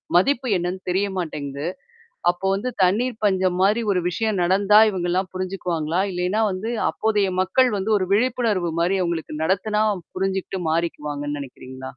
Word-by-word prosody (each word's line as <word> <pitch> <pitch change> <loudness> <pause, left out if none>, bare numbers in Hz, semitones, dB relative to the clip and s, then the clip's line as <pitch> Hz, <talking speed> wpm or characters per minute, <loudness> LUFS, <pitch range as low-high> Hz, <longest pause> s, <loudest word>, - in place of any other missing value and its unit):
மதிப்பு 255 +7 +3
என்னன்னு 180 +2 -3
தெரிய 195 +3 +1
மாட்டேங்குது. 145 -3 -4 0.6
அப்போ 175 +2 -4
வந்து 250 +6 -2
தண்ணீர் 225 +6 +1
பஞ்சம் 185 -2 +2
மாரி 210 +4 +3
ஒரு 180 - +1
விஷயம் 215 +2 -1
நடந்தா 200 +4 +4
இவுங்கலாம் 180 0 -1
புரிஞ்சுக்குவாங்களா? 180 -3 -2
இல்லேன்னா 180 +5 0
வந்து 195 +5 -3 0.2
அப்போதைய 210 -3 +1
மக்கள் 250 +8 +3
வந்து 200 +3 -2
ஒரு 185 - -1
விழிப்புணர்வுமாரி 195 -7 +1
அவுங்களுக்கு 170 -3 -3
நடத்துனா 210 +4 +1 0.3
புரிஞ்சுகிட்டு 190 0 -2
மாறிக்குவாங்கன்னு 150 -3 -2
நெனைக்கிறீங்களா? 130 -1 -10
185 Hz, 130 wpm, -22 LUFS, 170-205 Hz, 0.6 s, நடந்தா